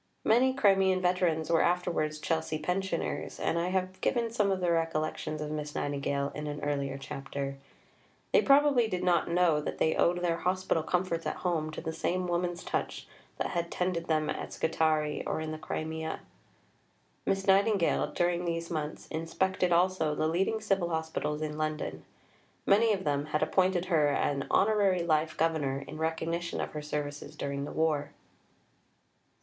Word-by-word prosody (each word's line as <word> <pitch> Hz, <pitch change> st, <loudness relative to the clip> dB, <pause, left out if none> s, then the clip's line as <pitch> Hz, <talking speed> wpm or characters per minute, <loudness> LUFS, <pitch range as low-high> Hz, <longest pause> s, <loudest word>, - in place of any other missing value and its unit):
Many 255 Hz, +4 st, +4 dB
Crimean 195 Hz, -6 st, +4 dB
veterans 180 Hz, -3 st, +1 dB
were 165 Hz, -, +4 dB
afterwards 170 Hz, -3 st, 0 dB
Chelsea 160 Hz, 0 st, -1 dB
pensioners, 180 Hz, +3 st, -2 dB
and 170 Hz, -, 0 dB
I 170 Hz, -, 0 dB
have 185 Hz, 0 st, -2 dB
given 235 Hz, -2 st, +1 dB
some 210 Hz, -3 st, +1 dB
of 190 Hz, -1 st, +1 dB
their 175 Hz, -2 st, +2 dB
recollections 155 Hz, -1 st, -1 dB
of 150 Hz, 0 st, -4 dB
Miss 150 Hz, -1 st, -4 dB
Nightingale 140 Hz, 0 st, -1 dB
in 150 Hz, 0 st, -5 dB
an 145 Hz, 0 st, -4 dB
earlier 140 Hz, -2 st, -1 dB
chapter. 135 Hz, 0 st, -5 dB, 0.7 s
They -, -, +6 dB
probably 275 Hz, -4 st, +5 dB
did 180 Hz, -4 st, -2 dB
not 175 Hz, -1 st, +2 dB
know 170 Hz, -3 st, +3 dB
that -, -, -4 dB
they 160 Hz, -, +2 dB
owed 175 Hz, +1 st, +2 dB
their 170 Hz, -1 st, +1 dB
hospital 185 Hz, -2 st, 0 dB
comforts 170 Hz, 0 st, -1 dB
at -, -, -2 dB
home 160 Hz, -3 st, 0 dB
to -, -, -5 dB
the 160 Hz, -1 st, -4 dB
same 185 Hz, +3 st, -1 dB
woman's 175 Hz, 0 st, -1 dB
touch -, -, -3 dB, 0.3 s
that -, -, -1 dB
had 170 Hz, -1 st, -1 dB
tended 180 Hz, -2 st, -1 dB
them 155 Hz, -1 st, +1 dB
at -, -, -4 dB
Scutari 155 Hz, -2 st, +1 dB
or -, -, -1 dB
in 155 Hz, 0 st, -4 dB
the 155 Hz, -, -5 dB
Crimea. 160 Hz, 0 st, -4 dB, 1.1 s
Miss 195 Hz, 0 st, +1 dB
Nightingale, 195 Hz, -1 st, +3 dB
during 175 Hz, 0 st, 0 dB
these 165 Hz, 0 st, -2 dB
months, 155 Hz, -2 st, -4 dB
inspected 180 Hz, +3 st, 0 dB
also 175 Hz, -3 st, +2 dB
the 155 Hz, -, +1 dB
leading 195 Hz, +7 st, 0 dB
Civil 195 Hz, -5 st, +1 dB
Hospitals 160 Hz, -2 st, -2 dB
in 150 Hz, 0 st, -4 dB
London. 155 Hz, 0 st, -3 dB, 0.6 s
Many 220 Hz, +3 st, +5 dB
of 195 Hz, -3 st, 0 dB
them 145 Hz, -1 st, 0 dB
had 150 Hz, 0 st, 0 dB
appointed 185 Hz, -1 st, +2 dB
her 160 Hz, -5 st, +3 dB
an 140 Hz, -1 st, 0 dB
Honorary 200 Hz, -4 st, +3 dB
Life 155 Hz, -1 st, +1 dB
Governor 145 Hz, -4 st, 0 dB
in 155 Hz, -, -8 dB
recognition 165 Hz, +1 st, -2 dB
of -, -, -3 dB
her 150 Hz, -, -5 dB
services 150 Hz, -1 st, -5 dB
during 140 Hz, 0 st, -3 dB
the -, -, -6 dB
war. 150 Hz, -3 st, 0 dB
165 Hz, 165 wpm, -30 LUFS, 155-185 Hz, 1.1 s, They